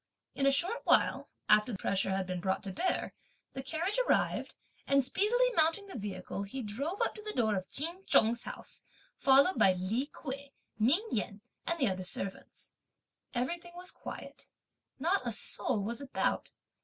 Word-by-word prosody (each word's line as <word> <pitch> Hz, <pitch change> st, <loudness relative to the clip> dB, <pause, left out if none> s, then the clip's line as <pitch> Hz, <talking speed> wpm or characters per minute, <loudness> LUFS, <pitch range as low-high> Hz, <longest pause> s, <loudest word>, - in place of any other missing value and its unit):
In 275 Hz, -, +1 dB
a -, -, +6 dB
short 360 Hz, -, +1 dB
while, -, -, +3 dB, 0.2 s
after 210 Hz, +1 st, +4 dB
pressure 195 Hz, +1 st, 0 dB
had 190 Hz, 0 st, 0 dB
been 180 Hz, 0 st, -3 dB
brought 190 Hz, +3 st, -1 dB
to 195 Hz, -, -3 dB
bear, 365 Hz, -, -1 dB, 0.4 s
the 265 Hz, -, -4 dB
carriage 330 Hz, -, -1 dB
arrived, -, -, +1 dB, 0.3 s
and 275 Hz, -1 st, +4 dB
speedily 470 Hz, -, +2 dB
mounting 325 Hz, +6 st, +4 dB
the 395 Hz, -, -10 dB
vehicle, 195 Hz, -3 st, -5 dB
he 225 Hz, +6 st, -5 dB
drove 280 Hz, -, -4 dB
up -, -, 0 dB
to 425 Hz, -, -10 dB
the 425 Hz, 0 st, -5 dB
door 220 Hz, -3 st, +1 dB
of 190 Hz, -1 st, -4 dB
Ch'in 335 Hz, +6 st, -1 dB
Chung's 230 Hz, +2 st, +4 dB
house, -, -, -7 dB, 0.3 s
followed 275 Hz, +7 st, +5 dB
by 190 Hz, -, +6 dB
Li 200 Hz, +9 st, -1 dB
Kuei, 280 Hz, -1 st, -6 dB, 0.3 s
Ming 305 Hz, -, +3 dB
Yen 205 Hz, -1 st, -2 dB, 0.3 s
and 335 Hz, -, 0 dB
the 270 Hz, -6 st, +2 dB
other 185 Hz, -1 st, -2 dB
servants. 190 Hz, +1 st, -4 dB, 0.6 s
Everything 340 Hz, +8 st, -3 dB
was 360 Hz, +1 st, -2 dB
quiet. -, -, -9 dB, 0.5 s
Not 340 Hz, +1 st, +1 dB
a -, -, 0 dB
soul 220 Hz, 0 st, +1 dB
was 235 Hz, +6 st, -3 dB
about. 275 Hz, -1 st, -1 dB
265 Hz, 165 wpm, -32 LUFS, 205-340 Hz, 0.6 s, a